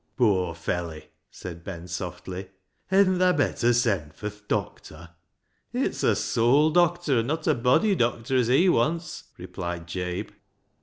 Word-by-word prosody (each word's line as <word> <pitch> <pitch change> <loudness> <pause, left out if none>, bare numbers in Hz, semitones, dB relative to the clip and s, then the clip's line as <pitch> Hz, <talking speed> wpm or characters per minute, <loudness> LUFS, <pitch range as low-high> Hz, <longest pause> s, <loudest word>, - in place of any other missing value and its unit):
" - - -45
Poor 95 -8 +2
felley," 85 -1 -4 0.3
said 85 -2 -9
Ben 90 -2 -7
softly; 95 +1 -6 0.2
" - - -47
hedn't 190 -1 +4
thaa 180 -3 +3
better 120 -3 +2
send 100 - 0
fur 105 0 -5
th' 105 +1 -22
doctor? 85 +2 -4 0.2
" - - -52
" - - -46
It's - - -1
a - - +3
soul 135 +7 +3
doctor 175 -5 +2
an' 115 - -1
not 155 +2 -2
a - - +4
body 125 - +3
doctor 120 -4 0
as 125 -3 +3
he 135 +10 +4
wants," 165 +3 0
replied 85 -1 -6
Jabe. 90 +1 -4
115 Hz, 165 wpm, -26 LUFS, -, 0.3 s, hedn't